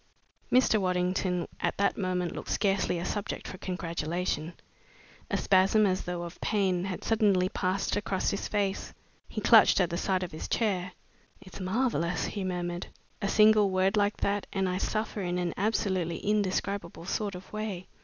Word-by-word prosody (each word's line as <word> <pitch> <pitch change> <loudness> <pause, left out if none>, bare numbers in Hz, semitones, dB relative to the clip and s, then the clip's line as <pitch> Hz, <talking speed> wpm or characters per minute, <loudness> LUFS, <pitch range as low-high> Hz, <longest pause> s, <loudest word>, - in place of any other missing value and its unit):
Mr. 245 -4 +4
Waddington 180 -1 0
at - - -1
that 200 - +2
moment 180 -3 -1
looked - - -7
scarcely 195 -3 +1
a 170 - -3
subject 205 -1 -3
for 185 - -8
congratulation. 170 -2 -3 0.8
A - - 0
spasm, 195 +2 +4
as 185 -1 0
though 175 -1 -3
of 170 0 -9
pain, 190 -4 +1
had 190 -2 -4
suddenly 200 -5 +3
passed 185 +1 -1
across 200 -2 0
his 200 - -3
face. 200 -2 -2 0.3
He - - -4
clutched - - +6
at 180 -3 +2
the 170 - -1
sides 185 -1 0
of 180 - -5
his 155 - -6
chair. 185 -5 0 0.5
"It's 190 -1 -12
marvelous!" 185 -4 0
he 200 - -4
murmured. 175 -1 -3 0.3
"A 200 - 0
single 215 0 +5
word 190 +2 +2
like 205 0 +2
that 200 0 -1
and 195 -1 0
I 180 0 -1
suffer 215 0 -2
in 180 -1 -1
an 175 -2 -1
absolutely 190 -5 0
indescribable 200 -3 -1
sort 200 +1 -2
of 180 +3 -11
way. 210 -4 -4
190 Hz, 165 wpm, -29 LUFS, 180-205 Hz, 0.8 s, clutched